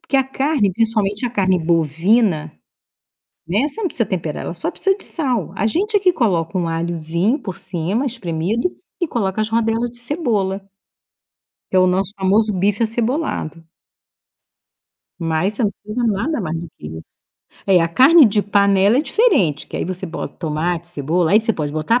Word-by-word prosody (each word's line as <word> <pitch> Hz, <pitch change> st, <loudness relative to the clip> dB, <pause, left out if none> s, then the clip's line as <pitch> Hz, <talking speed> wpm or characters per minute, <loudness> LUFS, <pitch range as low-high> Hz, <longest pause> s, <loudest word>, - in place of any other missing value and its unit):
porque 330 Hz, -4 st, -1 dB
a 270 Hz, -, +3 dB
carne, 265 Hz, -6 st, 0 dB
principalmente 215 Hz, +1 st, 0 dB
a -, -, -4 dB
carne 190 Hz, -5 st, +2 dB
bovina, 165 Hz, -, +1 dB, 0.9 s
né, 210 Hz, -, +1 dB
você 425 Hz, -, -7 dB
não 395 Hz, -, 0 dB
precisa 230 Hz, -, -2 dB
temperar, 165 Hz, -5 st, -3 dB
ela -, -, -4 dB
só 175 Hz, -, -2 dB
precisa 385 Hz, -, 0 dB
de -, -, -5 dB
sal. 255 Hz, -, -2 dB
A 210 Hz, -, +1 dB
gente 405 Hz, -, 0 dB
é -, -, +3 dB
que 370 Hz, -2 st, +4 dB
coloca 180 Hz, -, 0 dB
um 170 Hz, -2 st, -1 dB
alhozinho 170 Hz, -, -1 dB
por 190 Hz, -, -7 dB
cima, 190 Hz, -, -2 dB
espremido, 215 Hz, -, -2 dB, 0.3 s
e 345 Hz, -, 0 dB
coloca 205 Hz, -5 st, -1 dB
as 215 Hz, -, 0 dB
rodelas 230 Hz, +1 st, 0 dB
de 240 Hz, -, -3 dB
cebola 225 Hz, -, -1 dB, 1.1 s
que -, -, 0 dB
é -, -, +7 dB
o 185 Hz, -, +5 dB
nosso 190 Hz, +2 st, 0 dB
famoso 210 Hz, +3 st, +2 dB
bife 200 Hz, +3 st, 0 dB
acebolado. 230 Hz, -, -2 dB, 1.6 s
Mas 165 Hz, +5 st, 0 dB
você 230 Hz, -, -1 dB
não 205 Hz, -, +2 dB
precisa 235 Hz, +3 st, -2 dB
nada 230 Hz, +8 st, 0 dB
mais 165 Hz, -4 st, -3 dB
do 170 Hz, -, -6 dB
que -, -, -9 dB
isso. 80 Hz, +1 st, -8 dB, 0.6 s
É, 190 Hz, -3 st, +5 dB
a 165 Hz, -, +1 dB
carne 275 Hz, -, +7 dB
de 210 Hz, 0 st, +2 dB
panela 200 Hz, +1 st, +3 dB
é -, -, +2 dB
diferente, 205 Hz, -, +2 dB
que -, -, -7 dB
aí -, -, -2 dB
você 185 Hz, +1 st, -4 dB
bota 165 Hz, -, -6 dB
tomate, 170 Hz, +1 st, -2 dB
cebola. 165 Hz, +2 st, 0 dB
Aí, 215 Hz, -, +6 dB
você 225 Hz, 0 st, +1 dB
pode 150 Hz, -6 st, -3 dB
botar 155 Hz, +11 st, +1 dB
200 Hz, 180 wpm, -19 LUFS, 170-240 Hz, 1.6 s, é